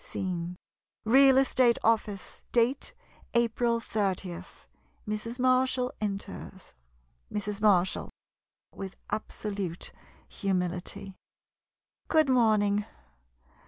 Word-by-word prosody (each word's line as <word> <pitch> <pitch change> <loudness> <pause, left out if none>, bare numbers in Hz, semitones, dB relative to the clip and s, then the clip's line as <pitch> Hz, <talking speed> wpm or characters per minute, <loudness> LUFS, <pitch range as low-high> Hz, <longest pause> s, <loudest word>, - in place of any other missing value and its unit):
Scene 180 -2 -4 0.3
— - - -54
Real 270 -1 +7
Estate 255 -3 +4
Office. 215 -3 0
Date 255 - +1 0.2
— - - -28
April 235 0 +2
30. 190 -5 -2 0.7
Mrs. 215 +3 -3
Marshall 255 0 +2
enters. 195 -2 -5 0.6
Mrs. 210 0 -3
Marshall 190 -4 +3 0.6
[With 195 -1 -7 0.2
absolute 200 -5 -4 0.4
humility.'] 185 0 -2 0.9
Good 310 -3 +3
morning. 210 -4 +3
210 Hz, 85 wpm, -29 LUFS, 195-245 Hz, 0.9 s, Real